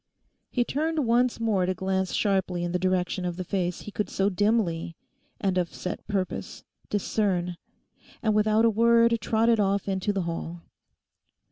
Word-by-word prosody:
He 245 - +1
turned 310 +3 -1
once 240 +1 +2
more 205 -5 +1
to 185 - 0
glance 190 0 -1
sharply 190 -3 0
in 175 - -2
the 180 - 0
direction 185 0 0
of 175 -1 -3
the 185 - -3
face 180 -1 -2
he 210 - -8
could 210 +1 -2
so 195 +1 +1
dimly—and 190 -2 -2
of 175 -2 -2
set 180 - -6
purpose—discern; 190 -1 -2 0.7
and 215 -2 +2
without 215 +1 +3
a - - +6
word 230 +1 +4
trotted 225 0 +2
off 200 0 +1
into 195 +1 0
the 195 -2 -1
hall. 170 0 -5
195 Hz, 150 wpm, -26 LUFS, 180-220 Hz, 0.7 s, a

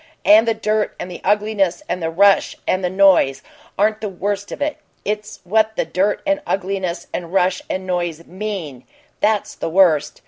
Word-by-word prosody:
And 220 +3 +6
the 225 - +2
dirt 215 -1 -1
and 180 - -6
the 175 - -8
ugliness 205 -3 +1
and 175 +1 -3
the 165 - -1
rush 195 +4 +3
and 185 0 +1
the 180 - +1
noise 190 -8 +4 0.3
aren't 215 +2 +1
the 215 - -3
worst 200 +2 -3
of - - -6
it; 295 +1 -1 0.3
it's 210 0 -4
what 220 +3 +1
the - - 0
dirt 200 +3 0
and 295 0 +1
ugliness 185 -3 -2
and 170 -1 -4
rush 180 -1 +1
and 185 0 -3
noise 175 -3 -2
MEAN 185 - -6 0.4
that's 210 -1 +1
the - - -4
worst! 165 -4 +3
195 Hz, 180 wpm, -20 LUFS, 180-210 Hz, 0.4 s, And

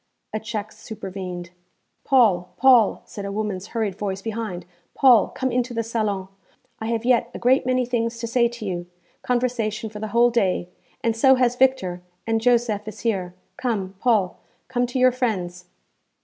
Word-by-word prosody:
A 215 - -1
check 215 -1 -5
supervened. 185 -4 -7 0.5
'Paul, 205 -10 +3
Paul!' 250 -5 +5
said 200 - -8
a 200 - -4
woman's 205 -2 -3
hurried 220 -4 -2
voice 195 -2 -3
behind 215 -6 -4 0.3
'Paul, 250 -6 +6
come 260 -1 -3
into 245 0 -1
the 230 - 0
salon. 215 -4 -2 0.5
I 220 - -4
have 230 0 -1
yet 240 -1 +3
a - - -3
great 255 +2 +3
many 255 0 +2
things 230 -1 -1
to 230 - -4
say 235 +1 +3
to 235 -2 -8
you 175 -2 -3 0.3
conversation 235 -3 -1
for 210 - -8
the 215 - -3
whole 235 +2 +4
day 190 -6 +1 0.3
and 230 -1 +1
so 265 +3 +6
has 250 -1 +2
Victor; 245 -9 +1 0.2
and 225 0 0
Josef 230 -3 +2
is 215 0 -8
here. 185 -6 -1 0.2
Come, 205 -7 -2
Paul 210 -7 +1 0.3
come 245 -1 0
to 245 - -4
your 255 0 +5
friends.' 185 -8 -2
225 Hz, 170 wpm, -23 LUFS, 200-245 Hz, 0.5 s, Paul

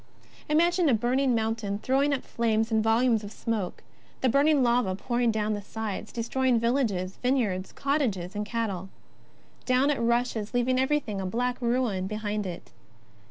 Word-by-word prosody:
Imagine 340 +2 +3
a 245 - +4
burning 250 +3 +1
mountain 220 -2 -1
throwing 270 +6 +1
up 275 - -1
flames 225 -1 0
and 220 -1 +2
volumes 225 0 +3
of 205 - -7
smoke; 215 -5 -3 0.4
the 260 - +3
burning 280 +2 +4
lava 235 -6 +2
pouring 240 +3 0
down 215 -1 0
the 205 - -3
sides, 215 -1 -5
destroying 245 +1 +1
fields, 225 -7 0
vineyards, 225 -8 0
cottages, 220 - -1
cattle. 210 -4 -3 0.8
Down 260 +3 +3
it 285 - -1
rushes, 235 -1 0
leaving 255 +1 +2
everything 260 -7 0
a - - -3
black 245 +5 -1
ruin 235 -6 0
behind 210 -1 -3
it. 175 -2 -8
230 Hz, 150 wpm, -27 LUFS, 210-255 Hz, 0.8 s, a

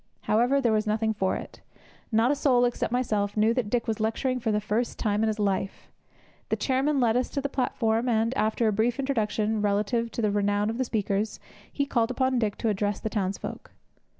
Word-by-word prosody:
However, 245 +6 +2
there 240 -4 +2
was 215 0 +1
nothing 220 +1 +1
for 190 -3 0
it. - - -8 0.5
Not 225 +4 +3
a - - +2
soul, 255 -3 +3
except 240 -2 -1
myself, 215 -5 0
knew 220 +2 +4
that 235 -4 -1
Dick 235 +1 0
was 225 -1 -1
lecturing 240 +4 0
for 225 -2 -1
the 210 - +1
first 215 +3 -2
time 210 -1 0
in 220 - +2
his 215 0 -1
life; 195 -2 -2 0.6
the - - +2
chairman 270 +2 +1
led 235 -3 +3
us 250 0 +1
to 280 - -3
the 280 - -1
platform; 240 -3 0
and, 230 +2 +1
after 220 0 +1
a 215 - +2
brief 230 +3 +1
introduction 220 -5 0
relative 210 +3 0
to 235 - -2
the 210 - +2
renown 205 +1 +1
of 230 - -6
the 260 - +1
speakers, 210 -2 -1 0.3
he 280 - -1
called 235 -4 +1
upon 260 0 +1
Dick 210 -3 0
to 230 - 0
address 205 0 -1
the 220 - -4
townsfolk. 195 -3 -4
225 Hz, 210 wpm, -27 LUFS, 210-245 Hz, 0.6 s, knew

